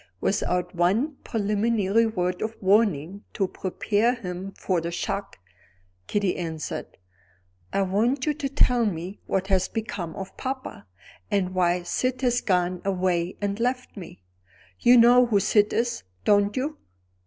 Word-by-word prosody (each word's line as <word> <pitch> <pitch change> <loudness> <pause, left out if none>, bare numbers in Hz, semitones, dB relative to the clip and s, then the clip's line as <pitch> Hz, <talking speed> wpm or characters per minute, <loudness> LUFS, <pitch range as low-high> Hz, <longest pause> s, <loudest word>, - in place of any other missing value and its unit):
Without 180 - 0
one 210 - +1
preliminary 215 0 +1
word 180 -4 -2
of 220 +1 -3
warning 195 -3 +2
to 195 - 0
prepare 210 +6 0
him 190 -3 -6
for 180 -3 -1
the 170 - -3
shock, 195 +3 -4 0.7
Kitty 200 -3 0
answered: 160 -3 -5 0.7
"I 195 - +1
want 230 +8 +1
you 300 - +1
to 285 -2 -3
tell 250 -4 +3
me 180 +1 -5
what 190 -1 0
has 190 -2 +2
become 205 -7 -4
of 190 0 -7
papa, 260 - -5 0.4
and 185 -2 0
why 180 -1 +1
Syd 255 +8 -1
has 245 -1 +2
gone 180 -2 0
away 180 -2 0
and 200 +1 -1
left 250 +1 -1
me. 175 - -10 0.6
You 245 +1 +6
know 245 +1 +7
who 210 -4 +3
Syd 210 +1 +3
is, 235 0 -1 0.2
don't 205 +1 +3
you?" 295 +4 -2
200 Hz, 140 wpm, -25 LUFS, 180-235 Hz, 0.7 s, know